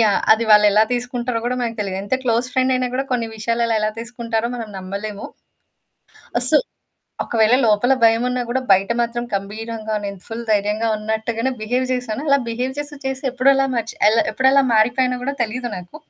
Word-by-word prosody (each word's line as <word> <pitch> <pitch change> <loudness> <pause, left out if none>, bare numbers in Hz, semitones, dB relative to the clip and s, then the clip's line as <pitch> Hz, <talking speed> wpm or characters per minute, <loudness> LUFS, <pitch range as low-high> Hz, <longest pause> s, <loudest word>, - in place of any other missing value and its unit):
Yeah! 210 -3 +3
అది 225 +1 +1
వాళ్ళెలా 210 0 +6
తీసుకుంటారో 245 -1 -2
కూడా 250 +1 -1
మనకు 230 -2 -3
తెలిదు. 195 -2 -3
ఎంత 205 +6 -1
క్లోజ్ 235 -1 +1
ఫ్రెండయినా 255 -1 +1
కూడా 270 +2 0
కొన్ని 240 -2 0
విషయాలలో 230 +1 0
ఎలా 215 0 0
తీసుకుంటారో 235 -1 -3
మనం 230 -3 -6
నమ్మలేము. 200 +2 -6 1.2
అస్సలు - - +4 0.6
ఒకవేళ 225 +1 +3
లోపల 220 +4 +3
భయమున్నా 245 +2 +3
కూడా 260 +2 0
బయట 195 +2 +3
మాత్రం 235 0 -2
గంభీరంగా 215 +2 -4
నేను 200 -1 -6
ఫుల్ 230 +1 -6
ధైర్యంగా 210 +2 +1
ఉన్నట్టుగానే 220 +3 -2
బిహేవ్ 245 +4 0
చేసాను. 250 -1 -3
అలా 280 0 +4
బిహేవ్ 250 +3 -2
చేసి 290 0 -6
చేసి, 265 +1 -3
ఎప్పుడలా 270 +2 +3
మర్చి 230 -1 -3
ఎలా 225 +1 +3
ఎప్పుడెలా 265 +1 +4
మారిపోయినా 245 +3 +2
కూడా 280 +2 -2
తెలీదు 240 +2 -4
నాకు. 180 +8 -10
230 Hz, 160 wpm, -20 LUFS, 215-250 Hz, 1.2 s, వాళ్ళెలా